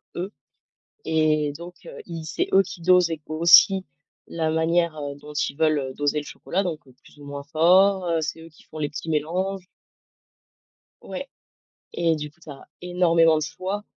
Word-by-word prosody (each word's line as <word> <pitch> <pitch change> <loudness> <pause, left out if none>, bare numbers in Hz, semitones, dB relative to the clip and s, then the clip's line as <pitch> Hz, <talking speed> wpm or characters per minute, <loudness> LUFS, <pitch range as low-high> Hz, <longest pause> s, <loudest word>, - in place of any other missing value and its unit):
eux 185 +3 -4 0.8
et 155 -2 +1
donc 175 +1 -10
heu, - - -10
ils 165 -2 -6
c'est 155 - -2
eux 195 - +6
qui 185 - -10
dosent 180 0 +4
ég 160 -2 -4
aussi 170 +4 +6 0.4
la 160 -1 -2
manière, 165 0 +1
heu, 145 -1 -5
dont 150 +1 -12
ils 145 - -2
veulent, 155 -1 +2
heu, 130 -1 -5
doser 145 +2 -1
le - - -7
chocolat, 190 +6 -3
donc 170 -5 -3
heu, 130 - -18
plus - - -20
ou 145 - -12
moins 140 0 -7
fort, 180 +5 +4
heu, 165 -1 +1
c'est 155 +1 -4
eux 165 - -12
qui 155 - -21
font 155 - -11
les 145 -1 -1
petits 155 +2 -7
mélanges 180 +5 -2 1.4
Ouais, - - -7 0.7
et 165 -1 +1
du 150 -1 -6
coup, 165 - -33
tu 160 - -15
as 140 -1 -11
énormément 170 -2 +3
de - - -2
choix 190 +6 -4
165 Hz, 190 wpm, -24 LUFS, 150-180 Hz, 1.4 s, eux